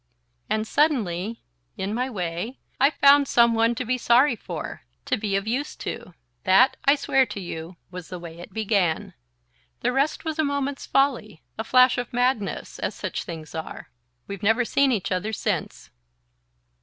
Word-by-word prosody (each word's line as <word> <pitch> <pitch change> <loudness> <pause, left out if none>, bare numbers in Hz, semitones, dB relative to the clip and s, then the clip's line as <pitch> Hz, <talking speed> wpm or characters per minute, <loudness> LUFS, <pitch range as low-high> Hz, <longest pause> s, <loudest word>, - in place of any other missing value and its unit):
And 215 0 0
suddenly, 225 - 0 0.3
in 195 +2 -3
my 250 +3 -1
way, 180 +3 -4 0.2
I 275 +2 +6
found 280 -1 +5
some 235 -1 +4
one 230 +1 +2
to 250 - -3
be 255 +2 0
sorry 245 +3 +4
for, - - -7 0.2
to - - +1
be 205 -2 -2
of 195 +1 0
use 260 +6 -2
to. 180 - -7 0.3
That, 195 +8 +5
I 280 - +6
swear 270 -2 +2
to 205 -1 -6
you, 170 -1 -7
was 180 -2 -8
the 180 - -5
way 170 -1 -10
it 175 - -10
began. 200 -7 0 0.7
The 245 - +1
rest 275 +6 0
was 315 0 -3
a - - +4
moment's 280 -1 -2
folly... 245 - 0
a 220 - -3
flash 255 +2 +5
of 245 0 -5
madness... 245 -4 -1
as - - -3
such - - -4
things 160 -3 -8
are. 160 -1 -7 0.3
We've 200 -2 -7
never 225 +4 +3
seen 275 +3 +2
each 210 -6 -1
other 185 +4 -1
since..." 220 - -3
230 Hz, 170 wpm, -24 LUFS, 190-265 Hz, 0.7 s, I